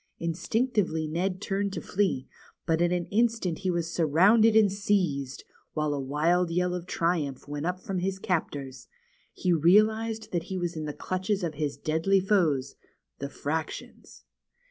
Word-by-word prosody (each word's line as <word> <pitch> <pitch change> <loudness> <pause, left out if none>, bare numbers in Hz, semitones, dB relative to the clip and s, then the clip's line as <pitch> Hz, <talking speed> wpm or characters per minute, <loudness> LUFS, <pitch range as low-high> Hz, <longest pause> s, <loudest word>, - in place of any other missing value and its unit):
Instinctively 170 0 0
Ned 180 +4 -1
turned 200 0 -1
to - - -3
flee, 190 -9 -1 0.4
but 165 0 +1
in 175 0 +3
an 175 -1 0
instant 225 -6 +1
he 190 - -1
was 170 -1 -1
surrounded 200 +8 +5
and 215 -3 +5
seized, 180 -10 -1 0.3
while 150 -1 0
a 145 - -2
wild 160 +6 +1
yell 180 +1 0
of 180 0 -5
triumph 160 -8 -1
went 145 +2 -3
up 180 0 -2
from 190 0 -3
his 190 +1 -1
captors. 145 -8 -3 0.4
He 180 -2 0
realized 215 +6 +3
that 175 -2 -1
he 190 - -2
was 175 -1 -2
in 155 -1 -4
the 150 - -4
clutches 185 +4 -2
of 165 -2 -1
his 145 -1 -3
deadly 165 +5 +2
foes, 175 -9 +1 0.5
the 140 - -4
fractions. 155 +3 -5
175 Hz, 160 wpm, -28 LUFS, 155-195 Hz, 0.5 s, surrounded